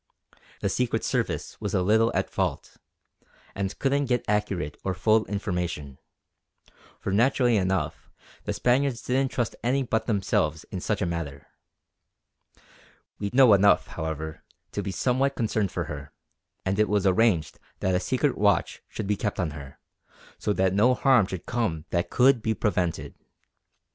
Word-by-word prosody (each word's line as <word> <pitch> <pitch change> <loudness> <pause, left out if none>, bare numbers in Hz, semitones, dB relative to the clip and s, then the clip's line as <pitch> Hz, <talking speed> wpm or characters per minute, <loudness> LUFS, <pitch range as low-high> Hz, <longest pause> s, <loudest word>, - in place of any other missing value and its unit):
The - - 0
Secret 125 -2 0
Service - - -2
was - - -2
a 90 - +2
little 110 +4 +3
at - - +1
fault, - - -3 0.8
and 100 0 -3
couldn't 140 +1 +1
get 125 -1 0
accurate 95 -7 -1
or 95 -1 -1
full 110 0 +3
information; 90 -9 -3 1.0
for - - -3
naturally 120 +3 +3
enough 95 -2 -1 0.4
the - - -1
Spaniards 125 0 +1
didn't 130 +1 +1
trust 120 -3 -2
any 135 +3 +1
but 110 -3 -1
themselves 85 -7 0
in 95 - -4
such 105 +1 -1
a - - +1
matter. 80 -5 -4 1.7
We 100 - -2
know 130 -4 +7
enough, 100 +1 +4
however, 80 -1 -5 0.3
to - - -3
be - - -4
somewhat 130 +8 +1
concerned 110 -4 0
for - - -2
her; - - -7 0.5
and 95 +2 0
it 110 - +3
was 100 -1 +1
arranged 95 -4 +2 0.2
that 95 - +1
a 90 - +2
secret 130 +9 0
watch 100 0 +1
should 105 - -5
be 105 +1 +1
kept 105 0 -3
on 85 -4 0
her, 70 -2 -10 0.6
so - - -1
that 95 -2 +1
no 120 +6 +4
harm 125 -9 +4
should 95 -3 -6
come 90 -10 -2
that 85 0 0
could 130 -1 +4
be 110 0 0
prevented. 90 -6 -1
105 Hz, 155 wpm, -26 LUFS, 90-120 Hz, 1.7 s, know